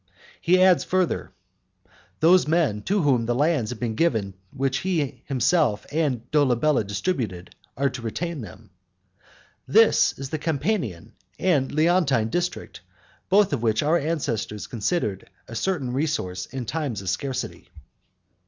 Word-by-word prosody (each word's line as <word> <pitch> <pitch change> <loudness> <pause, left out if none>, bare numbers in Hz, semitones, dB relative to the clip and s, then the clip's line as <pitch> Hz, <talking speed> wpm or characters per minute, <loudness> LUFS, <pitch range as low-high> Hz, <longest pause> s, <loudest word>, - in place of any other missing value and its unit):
He 180 +2 +4
adds 185 -2 +5
further, 185 -2 -1 0.9
"Those 175 +1 +5
men 150 -10 +1
to 200 -2 +1
whom 125 -5 +2
the 120 - +1
lands 145 -5 +1
have 125 - -6
been 115 -1 -2
given 110 - 0 0.2
which 135 0 -1
he 165 -7 -2
himself 135 -4 +1
and 145 -7 0
Dolabella 145 -2 +3
distributed, 100 - -3 0.2
are 140 0 +1
to 130 - -7
retain 155 +7 -4
them." 105 -6 -12 1.0
This - - +4
is 135 0 -6
the 155 - -2
Campanian 145 - -2 0.2
and 145 -8 +1
Leontine 155 -8 +2
district, 175 +7 -3 0.5
both 200 -2 +4
which 115 0 0
our 160 +4 +3
ancestors 120 - -2
considered 110 - -2 0.2
a - - -10
certain 140 -3 -1
resource 125 - -2
in 130 -2 -6
times 125 -6 -3
of 95 - -3
scarcity. 130 -7 -4
140 Hz, 135 wpm, -24 LUFS, 115-165 Hz, 1.0 s, adds